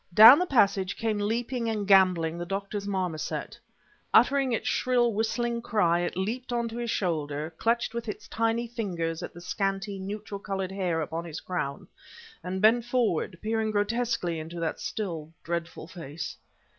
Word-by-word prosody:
Down 225 +7 +11
the 360 - 0
passage 200 - +2
came 220 -2 -1
leaping 230 +3 -1
and 210 -3 -2
gamboling 180 -4 +4
the - - -2
doctor's 200 +1 -3
marmoset. 180 -5 -3 0.5
Uttering 275 -2 +4
its 230 - -1
shrill, 240 -2 +2
whistling 235 +2 -1
cry, 180 -8 +2
it 175 0 -2
leaped 235 +7 -3
onto 235 -1 -1
his 240 -1 -3
shoulder, 155 -5 -2
clutched 235 0 +1
with 235 0 -4
its - - -6
tiny 230 +1 0
fingers 175 -8 -3
at - - -6
the 175 - -12
scanty, 195 +1 -2
neutral 200 +1 -5
colored 195 -2 -3
hair 180 -4 -1
upon 160 +2 -3
his 160 -2 -6
crown, 140 -7 -4 0.6
and 185 +2 -3
bent 230 +2 +6
forward, 230 -8 0
peering 220 0 0
grotesquely 205 -5 0
into 165 +2 -7
that 165 -1 -2
still, 165 -7 -4
dreadful 170 -1 -4
face. 165 -3 -7
200 Hz, 155 wpm, -28 LUFS, 175-230 Hz, 0.6 s, Down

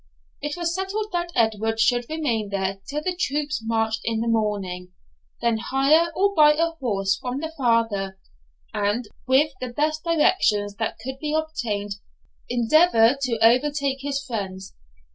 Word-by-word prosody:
It 295 +3 -3
was 340 -1 -1
settled 400 +4 -3
that 345 -1 -2
Edward 225 -1 +1
should 240 +1 +2
remain 245 -10 -1
there 195 -1 -2
till 300 +1 -3
the 365 +1 -1
troops 295 -5 -1
marched 225 -1 0
in 225 -1 -1
the 230 - -2
morning, 200 -5 -1 0.5
then 235 -1 +2
hire 280 +8 +3
or 400 +1 +2
buy 300 -4 +6
a 330 +2 +1
horse 200 -11 -1
from 250 +1 -4
the 320 +1 -5
farmer, 225 -7 0 0.6
and, 210 +3 -1 0.2
with 275 +3 +3
the 255 - -3
best 305 +5 -1
directions 295 - +2
that 225 - -2
could 265 +4 -7
be 300 +1 -2
obtained, 215 -11 -2 0.5
endeavour 245 0 +4
to 250 -4 0
overtake 275 +2 +1
his 280 0 -2
friends. 190 -6 -5
250 Hz, 150 wpm, -24 LUFS, 220-305 Hz, 0.6 s, buy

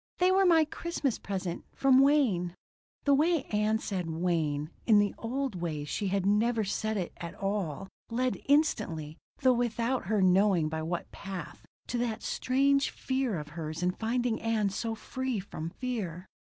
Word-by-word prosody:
"They 365 +1 +4
were 385 +1 +4
my 325 -2 +6
Christmas 305 -5 -2
present 185 -3 -4
from 265 -1 +5
Wayne." 245 -12 +3 0.5
The 285 - +4
way 310 +1 +3
Ann 210 +1 +2
said 185 -6 -3
Wayne 160 -3 -1 0.2
in 220 -3 +7
the 205 -1 +3
old 245 -5 -3
days 150 -4 -3
she 205 - -1
had 190 0 0
never 220 +3 +2
said 215 +2 -1
it 180 -3 -3
at 170 +2 -7
all 195 -4 -2 0.2
led 250 +2 -1
instantly, 210 - +1 0.2
though 260 -1 +5
without 240 0 0
her 215 0 +2
knowing 185 -3 +4
by 160 0 -3
what 170 +2 -4
path, 195 -3 -8 0.2
to 240 - -2
that 235 -2 -2
strange 275 +2 +2
fear 260 -6 -1
of 150 -1 -6
hers 160 +1 -5
in 180 - +3
finding 230 +3 -1
Ann 220 -3 +1
so 225 +3 -2
free 260 0 -3
from 165 -4 -6
fear. 190 -7 -4
210 Hz, 165 wpm, -30 LUFS, 180-255 Hz, 0.5 s, in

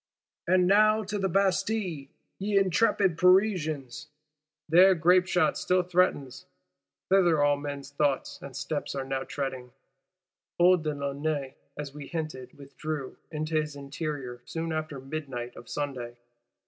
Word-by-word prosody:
—And 180 0 +4
now, 215 +3 +4
to 205 +1 -3
the 190 -1 0
Bastille, 190 -4 0 0.3
ye 200 +1 0
intrepid 195 -2 +2
Parisians! 160 - +2 0.6
There 185 +4 +6
grapeshot 180 +2 +3
still 185 0 +2
threatens; 170 -7 0 0.6
thither 175 -6 +4
all 145 0 +4
men's 145 -1 -6
thoughts 145 -1 -1
and 140 -2 -9
steps 145 0 -3
are 135 -1 -3
now 135 0 -3
tending. 130 -3 -5 0.8
Old 180 -1 +5
de 150 -1 -2
Launay, 140 0 -3 0.2
as 145 -2 -6
we 145 -1 -8
hinted, 155 -6 -6
withdrew 145 0 -6
"into 155 0 -1
his 150 -1 -7
interior" 140 -3 -5
soon 165 +3 -4
after 155 -3 -4
midnight 135 -3 -6
of 120 - -12
Sunday. 125 -5 -4
155 Hz, 130 wpm, -28 LUFS, 140-180 Hz, 0.8 s, There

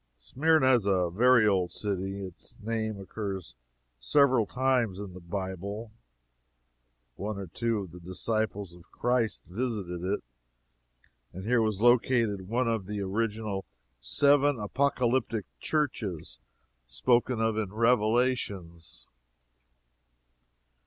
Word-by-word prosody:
Smyrna 130 - +3
is 115 -5 +2
a 90 -3 +2
very 120 +3 +5
old 95 -3 +2
city. 95 -1 -3
Its 90 -2 -12
name 110 -1 -2
occurs 95 - -5 0.5
several 125 - +3
times 125 -6 +1
in 100 -3 -7
the 90 - -9
Bible, 95 +4 -5 1.3
one 105 +2 -4
or 100 - -5
two 110 +5 -1
of 95 -4 -8
the 90 - -11
disciples 100 +1 -2
of 85 +1 -17
Christ 120 -2 0
visited 95 -5 -3
it, 100 +3 -1 1.1
and 95 - -7
here 115 +2 +2
was 110 -2 -1
located 115 -5 +3
one 120 +3 0
of 110 -5 -1
the 105 0 -3
original 105 0 -2 0.4
seven 140 - +3
apocalyptic 120 -1 0
churches 100 - -2 0.5
spoken 120 - +1
of 110 -1 +1
in 105 -3 -2
Revelations. 105 - 0
105 Hz, 110 wpm, -29 LUFS, 95-120 Hz, 1.3 s, very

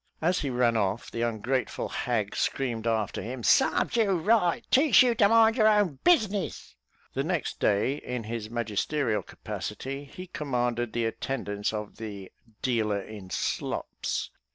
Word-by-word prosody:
As 175 +3 +1
he 145 - -2
ran 120 -2 +2
off, 105 +1 -1
the 115 - -3
ungrateful 120 +3 -1
hag 110 -5 -1
screamed 120 -4 -1
after 110 -3 0
him, 120 +1 -6
"Sarves 265 - +3
you 210 -4 +3
right; 180 -1 +2
teach 280 0 +6
you 245 -2 +3
to 205 -3 +4
mind 225 +1 +5
your 215 -2 +5
own 205 -9 +3
business." 210 - +1 0.4
The - - -1
next - - -2
day, 105 +8 +2
in 125 -4 -5
his 110 0 -5
magisterial 115 +2 -1
capacity, 135 +2 -6
he 180 +6 -9
commanded 120 -8 -2
the 120 -1 0
attendance 105 -3 -2
of 105 -1 -6
"the 100 -4 -7 0.3
dealer 110 -5 +1
in 100 -3 -10
slops." - - -3
125 Hz, 150 wpm, -28 LUFS, 110-180 Hz, 0.4 s, teach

